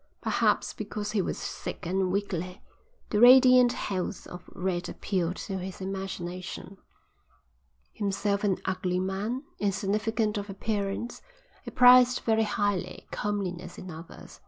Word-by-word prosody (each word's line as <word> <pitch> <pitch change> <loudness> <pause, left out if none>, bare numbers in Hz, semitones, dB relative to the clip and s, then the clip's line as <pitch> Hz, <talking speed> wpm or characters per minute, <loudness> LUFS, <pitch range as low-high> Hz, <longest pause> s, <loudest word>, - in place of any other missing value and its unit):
Perhaps - - +1
because 210 -1 -5
he 210 - +1
was - - -3
sick - - -6
and 185 +1 0
weakly, 185 -2 -3 0.5
the 210 - +2
radiant 250 0 +8
health 185 0 -3
of 180 0 -10
Red 180 -1 -2
appealed 180 -3 -2
to 190 -1 -4
his 185 +1 -7
imagination. 190 0 -6 1.1
Himself 200 0 -1
an 195 -3 +2
ugly 185 -1 -1
man, 200 +8 -2 0.2
insignificant 210 +2 0
of 205 0 -7
appearance, 200 +2 -3 0.4
he - - -6
prized 250 0 +6
very 225 -1 +2
highly 205 -3 -1
comeliness 185 -4 -3
in 185 - -8
others. 165 +1 -11
195 Hz, 125 wpm, -28 LUFS, 185-210 Hz, 1.1 s, radiant